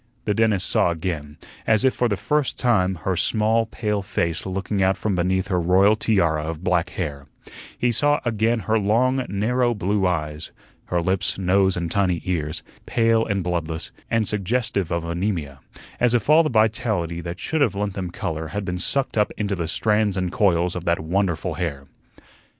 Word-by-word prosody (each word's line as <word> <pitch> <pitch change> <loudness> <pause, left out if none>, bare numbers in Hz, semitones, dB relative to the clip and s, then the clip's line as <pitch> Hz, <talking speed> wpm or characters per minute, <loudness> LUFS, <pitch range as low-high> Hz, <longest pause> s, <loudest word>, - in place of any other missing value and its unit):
The 105 - +1
dentist 110 -4 +2
saw - - +2
again, 80 -3 -4 0.3
as 110 +2 +4
if 130 - +4
for 125 - +1
the 105 -4 -1
first 150 +3 0
time, 95 -7 +2
her 95 - +1
small, 110 +4 +1
pale 105 -2 -2
face 85 -2 -2
looking 95 +1 -2
out 95 +1 +2
from 105 - -1
beneath 95 +2 0
her 90 -2 +1
royal 95 +5 +4
tiara 85 -9 +1
of 80 +1 -5
black 90 -1 +1
hair; 75 -6 -5 0.5
he 120 - +1
saw 145 +6 +3
again 115 0 +1
her 110 +1 +1
long, 125 +6 +2
narrow 120 +5 +1
blue 100 -1 0
eyes; 75 -4 -3 0.3
her 85 -1 -1
lips, 95 0 0
nose, 95 0 +2
and 85 -1 -3
tiny 90 -3 +1
ears, 80 -3 -2 0.2
pale 115 -1 +3
and 100 -4 -1
bloodless, 85 -2 -3 0.2
and 115 -2 +1
suggestive 105 -2 -1
of 85 -1 -1
anaemia, 85 -5 -3 0.4
as 125 0 +3
if 120 +5 +1
all 155 +2 +7
the 155 - 0
vitality 110 -7 0
that 85 +1 -6
should 160 -1 -1
have 115 -8 +2
lent 100 -1 -2
them 95 -2 -4
color 80 -1 -4
had 100 +6 -4
been 90 -1 -3
sucked 135 +2 0
up 105 - +2
into 100 -1 -1
the 85 -4 -2
strands 105 +2 +1
and 90 -1 -1
coils 90 -3 +2
of 90 - -4
that 85 0 +1
wonderful 85 0 -1
hair. 70 -6 -4
95 Hz, 185 wpm, -23 LUFS, 85-110 Hz, 0.5 s, all